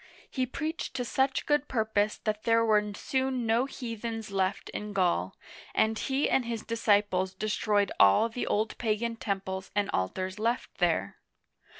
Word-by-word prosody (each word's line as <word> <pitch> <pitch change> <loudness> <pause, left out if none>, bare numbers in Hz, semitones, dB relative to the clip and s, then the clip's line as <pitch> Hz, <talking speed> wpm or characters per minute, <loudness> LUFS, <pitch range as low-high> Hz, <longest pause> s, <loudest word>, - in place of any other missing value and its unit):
He 260 -2 -1
preached 310 +2 -4
to 250 -2 -1
such 265 +2 +1
good 295 -1 +2
purpose 215 -3 0
that 215 -1 -1
there 230 0 +3
were 210 -1 +3
soon 260 -1 -1
no 230 +3 +3
heathen 230 -4 -5
left 195 0 -1
in 210 0 -5
Gaul, 175 - +1 0.4
and 220 0 +2
he 270 +2 +1
and 265 - +2
his 230 -2 -3
disciples 205 -4 +1
destroyed 210 0 +1
all 100 - +6
the 230 +2 -4
old 215 +1 0
pagan 230 +1 0
temples 190 -3 -3
and 205 -1 +1
altars 185 - -2
left 230 +3 -1
thene. - - +1
220 Hz, 155 wpm, -29 LUFS, 205-235 Hz, 0.4 s, all